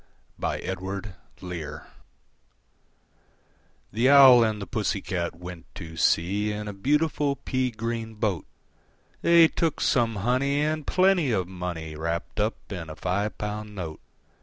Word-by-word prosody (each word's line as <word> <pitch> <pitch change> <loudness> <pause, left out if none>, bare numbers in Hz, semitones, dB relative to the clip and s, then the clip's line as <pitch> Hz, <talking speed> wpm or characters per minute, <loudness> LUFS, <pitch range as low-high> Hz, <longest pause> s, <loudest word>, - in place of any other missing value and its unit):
I. - - -1
The 95 -3 -6 2.2
Owl 135 -4 +9
and 110 -2 0
the 100 - -5
Pussy 105 -3 -1
Cat 85 -4 -3
went 90 0 -9
to 80 -5 -8
sea 100 +6 +1
In 105 0 -5
a 105 - -4
beautiful 145 +5 +1
pea 130 -2 -1
green 115 0 -4
boat: 105 -7 -1 0.7
They 170 -1 +7
took 165 0 -1
some 115 -4 +2
honey, 130 +7 +1
and 155 0 -1
plenty 185 -6 +3
of 95 -5 0
money 90 -4 -5
Wrapped 85 +6 -3
up 105 +2 +1 0.2
in 85 -5 -5
a 80 - -7
five 100 +5 -2
pound 105 0 -5
note. 80 -5 -6
105 Hz, 130 wpm, -26 LUFS, 90-130 Hz, 2.2 s, Owl